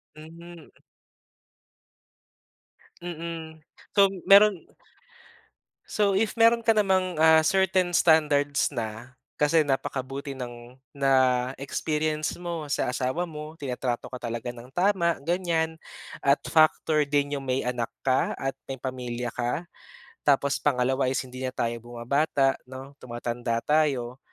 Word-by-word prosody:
Mhm. 165 +1 -13 2.3
Mm, 165 -2 -7 0.3
so 200 -1 +6 0.2
meron 200 -2 +6 1.2
So, 200 -2 +1
if 215 +1 +1
meron 230 0 +4
ka 225 - +5
namang, 190 -5 +1
ah, 160 0 +6
certain 190 -1 +2
standards 150 -4 +3
na, 115 +1 -6 0.2
kasi 155 +2 +3
napakabuti 135 -1 -3
ng 120 -2 -9 0.2
na-experience 140 +4 0
mo 170 -3 -4
sa - - 0
asawa 130 +8 -2
mo. 150 0 -8
Tinatrato 125 -5 -4
ka 125 - -6
talaga 120 -1 -5
ng 120 0 -9
tama, 175 -3 +1
ganiyan. 165 0 -1 0.5
At 140 +1 +4
factor 155 -1 +3
din 145 0 0
yung 135 - -7
may 130 +1 0
anak 120 -2 -3
ka 130 -1 +1
at 135 0 -4
may 135 -2 -7
pamilya 125 -2 -4
ka. 125 +9 -3 0.6
Tapos 140 0 +3
pangalawa 130 -1 +1
is 130 +1 -1
hindi 130 0 -10
na 130 - -6
tayo 115 - 0
bumabata 135 +4 0
'no, 130 +1 -9
tumatanda 120 -1 -3
tayo. 135 -5 +1
145 Hz, 120 wpm, -26 LUFS, 125-165 Hz, 2.3 s, so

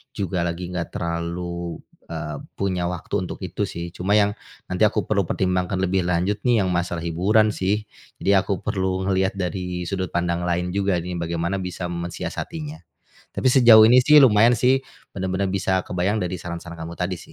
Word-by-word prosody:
juga 95 -2 -2
lagi 85 +1 -4
enggak 90 -2 -4
terlalu 85 0 -4 0.2
eee 75 -1 -5 0.2
punya 90 -3 -1
waktu 90 +1 -6
untuk - - -7
itu, - - -2
sih. 85 0 -6
Cuma 95 +4 0
yang 105 -1 +4 0.4
nanti 90 +3 +1
aku 105 0 -1
perlu 100 -4 0
pertimbangkan 90 0 0
lebih 95 -1 0
lanjut 90 +4 0
nih 115 -4 +4
yang 95 - 0
masalah 85 -1 -2
hiburan, 100 +6 +2
sih. 100 +3 0 0.3
Jadi 100 - +1
aku 95 0 -1
perlu 95 -2 -1
ngelihat 95 0 +1
dari 90 -1 -3
sudut 95 -1 -3
pandang 85 0 -1
lain 90 +1 -1
juga 100 -2 +1
nih, 90 +1 -5
bagaimana 85 +3 -2
bisa 90 0 -5
mensiasatinya. 145 - -5 0.6
Tapi 130 - +1
sejauh 120 -4 +8
ini 125 +2 +7
sih 150 +2 +7
lumayan 115 -1 +6
sih, 130 +3 +3 0.3
bener-bener 95 0 -1
bisa 95 -1 +1
kebayang 90 +4 0
dari 90 0 -2
saran-saran 85 0 -7
kamu 80 +1 -6
tadi, 90 +1 -1
sih. - - -14
90 Hz, 175 wpm, -23 LUFS, 85-100 Hz, 0.6 s, sejauh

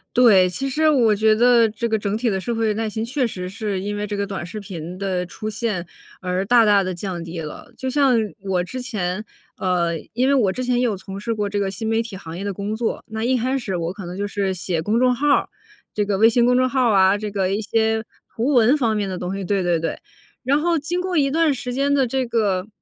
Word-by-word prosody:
对， 200 -7 +6
其 270 +9 -3
实 310 +4 +2
我 235 -7 +4
觉 215 +1 +4
得 235 0 +5
这 230 +2 -3
个 220 -1 +1
整 205 0 -2
体 235 0 0
的 190 - 0
社 235 - -2
会 225 -2 +1
耐 220 0 -2
心 220 +1 -3
确 260 +1 0
实 180 -5 -4
是 205 -1 -3
因 205 +2 -3
为 205 0 -2
这 205 0 -4
个 200 0 -1
短 195 -3 -5
视 210 +5 -7
频 180 -3 -7
的 185 -2 -2
出 215 +5 -6
现， 210 -5 -3 0.3
而 185 +1 -2
大 235 +1 +5
大 200 -2 +4
地 185 0 -3
降 175 -1 -5
低 170 0 -6
了。 155 +9 -8
就 260 - -3
像 275 -1 +3 0.3
我 190 -2 0
之 255 +8 -5
前 210 -4 -3 0.3
呃， 170 -3 0
因 250 +3 +1
为 280 - +4
我 205 -8 +3
之 255 +4 -4
前 250 -1 +1
也 245 - +2
有 220 -6 0
从 195 +1 -8
事 230 +3 -2
过 210 -2 -1
这 205 - -3
个 195 -1 -1
新 220 +4 -4
媒 225 +1 +2
体 225 -5 -7
行 165 -2 -8
业 195 - -5
的 200 -1 -2
工 205 +3 -3
作， 225 0 -2
那 220 +1 -4
一 255 +1 +2
开 260 +3 0
始 210 -7 -4
我 170 +2 -3
可 195 -3 -8
能 180 +2 -7
就 205 0 -2
是 200 -2 -1
写 170 -2 -2
公 220 +7 +1
众 250 -1 +3
号 295 +4 -1
儿， 285 - +3 0.4
这 210 - 0
个 200 -1 0
微 225 +2 +6
信 235 +1 +3
公 250 0 +4
众 255 0 +3
号 255 -2 +2
儿 - - +3
啊， 190 +1 +5
这 210 -1 -5
个 195 -2 0
一 215 - -2
些 220 +1 +1 0.3
图 230 +3 0
文 250 -2 +5
方 225 -5 +1
面 205 -2 -1
的 185 -1 -4
东 180 +1 -4
西 195 - -4
对 195 -1 0
对 175 -2 +1
对， 165 - -3 0.5
然 280 +4 +2
后 335 +1 +1
经 340 +5 -2
过 365 -2 -1
一 275 -2 +2
段 320 -1 +3
时 250 -1 -5
间 280 +2 +1
的 270 -2 +3
这 260 +1 -1
个 205 -5 0
215 Hz, 285 characters per minute, -21 LUFS, 190-245 Hz, 0.5 s, 对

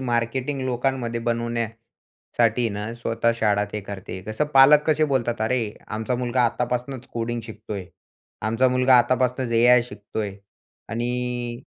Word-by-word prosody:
Marketing 125 +3 -1
लोकांमध्ये 125 -2 -1
बनवण्यासाठी 115 0 -2
ना, 105 +2 -4
स्वतः 115 0 0
शाळा 105 -2 +2
ते 105 - -3
करते 95 -1 -7
कसं, 110 +8 -1
पालक 140 +3 +8
कसे 155 0 +3
बोलतात, 120 -3 0
"अरे! 120 +3 +1 0.3
आमचा 110 +3 -2
मुलगा 125 0 0
आत्तापासनंच 125 +2 -2
कोडिंग 120 0 -2
शिकतोय, 110 -3 -7 0.6
आमचा 115 +4 +2
मुलगा 125 0 +5
आत्तापासनंच 125 0 +1
एआय 120 +1 +6
शिकतोय." 105 -3 -5 0.5
आणि 120 +1 -3
120 Hz, 125 wpm, -24 LUFS, 115-125 Hz, 0.6 s, पालक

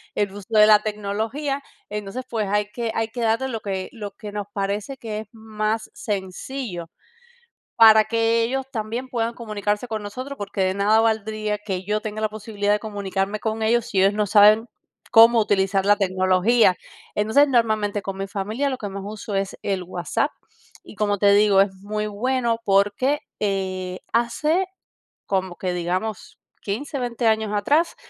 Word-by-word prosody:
el 205 -2 0
uso 205 -1 -10
de 215 -1 +7
la 210 -1 +7
tecnología. 220 +7 -2 0.3
Entonces, 210 +4 -5
pues 220 -3 -1
hay 205 0 0
que 230 0 -3
hay 225 0 0
que 240 +2 -6
darle 230 +4 +1
lo 230 -3 -3
que 190 -2 -4
lo 210 -3 -6
que 205 +1 -9
nos 205 -1 -4
parece 205 +6 -3
que 220 -4 -5
es 215 - -8
más 220 0 -3
sencillo, 190 -1 -5 0.9
para 220 -1 +8
que 230 +1 +2
ellos 265 +3 -1
también 230 +2 -4
puedan 235 -2 -2
comunicarse 210 -1 -2
con 220 -2 -3
nosotros, 255 +7 -7
porque 200 -1 -3
de 185 0 +2
nada 205 +3 +3
valdría 215 -1 0
que 190 -3 -4
yo 210 +2 0
tenga 215 0 -5
la 215 - +2
posibilidad 205 -1 -2
de 210 - +2
comunicarme 200 -1 -3
con 220 0 -2
ellos 230 +1 +2
si 195 - 0
ellos 195 +2 +4
no 210 0 +1
saben 210 +2 +6 0.5
cómo 230 0 +8
utilizar 195 -2 +1
la 205 0 +5
tecnología. 185 +2 +3 0.4
Entonces, 220 +8 +4
normalmente, 215 -5 +1
con 195 0 -5
mi 195 0 -4
familia 215 +9 -2
lo 260 - -3
que 205 - -5
más 195 0 -6
uso 210 0 -6
es 195 0 -2
el 195 -2 -1
WhatsApp, 180 - -1 0.5
y - - -12
como 205 0 0
te 200 +1 +5
digo, 205 -1 +5
es 195 -1 -2
muy 210 +2 -4
bueno, 235 +2 0
porque, 205 +8 +2 0.2
eh, 185 -2 -2
hace 300 +10 +1 0.6
como 190 -2 -1
que, 185 0 -2
digamos, 180 +4 -3 0.2
15, 275 +8 -3
20 240 -1 -2
años 220 -1 +1
atrás, 295 +11 +2
210 Hz, 170 wpm, -23 LUFS, 200-230 Hz, 0.9 s, para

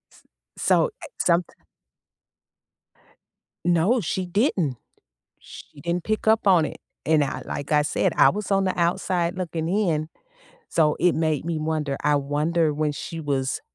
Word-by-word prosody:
S - - -22 0.3
so, - - +3
eh, - - -7 0.2
someth 170 0 +1 2.1
No, 175 +8 +3
she 185 +1 -2
didn't. 175 - 0 0.6
She 145 - -13
didn't 170 +1 -2
pick 215 0 -2
up 220 -2 +3
on 175 -5 +5
it. - - -6 0.3
And 155 -2 +3
I 140 - -4
like 145 +1 -5
I 150 -1 +5
said, 150 - 0
I - - +7
was 210 0 -4
on 195 0 +3
the 185 - -1
outside 175 +1 0
looking 165 -3 -3
in, 170 -6 0 0.6
so 155 -2 +2
it 180 0 +4
made 155 -3 0
me 165 -1 -2
wonder. 155 -3 -2
I 150 - +3
wonder 150 +3 0
when 150 0 -1
she 165 +3 -6
was 135 -3 -1
165 Hz, 155 wpm, -24 LUFS, 150-180 Hz, 2.1 s, I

